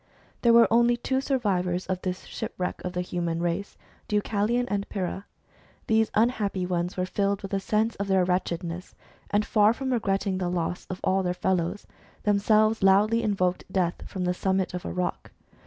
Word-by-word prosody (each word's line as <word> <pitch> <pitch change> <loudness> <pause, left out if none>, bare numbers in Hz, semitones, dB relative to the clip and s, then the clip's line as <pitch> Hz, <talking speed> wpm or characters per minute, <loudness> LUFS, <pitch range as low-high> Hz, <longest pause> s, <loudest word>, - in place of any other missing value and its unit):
There 235 - +5
were 230 0 +7
only 240 +1 +4
two 265 +2 -1
survivors 190 -10 0
of 185 -1 -3
this 185 -1 -3
shipwreck 180 0 -5
of 180 - -4
the 180 - -1
human 170 -2 -2
race, 175 +4 -2 0.3
Deucalion 210 +3 +1
and 200 -2 -2
Pyrrha. 190 0 -4 0.6
These 220 0 +2
unhappy 210 -5 +1
ones 180 +1 -2
were 185 - 0
filled 200 +1 -1
with 195 - -6
the 195 - +1
sense 215 +3 0
of 200 - -3
their 190 -2 +3
wretchedness, 180 -1 -2 0.3
and 205 +1 +1
far 215 0 +4
from 260 +1 -2
regretting 195 -4 0
the 180 -1 -1
loss 175 0 -2
of 185 - -5
all 190 +1 +2
their 180 -1 -1
fellows, 185 +1 -1 0.4
themselves 215 +2 +3
loudly 205 +4 +4
invoked 190 -4 -1
death 180 -3 0
from 185 - -4
the 180 0 +1
summit 190 0 0
of 180 - -5
a - - -3
rock. 180 -1 -3
195 Hz, 175 wpm, -26 LUFS, 180-215 Hz, 0.6 s, were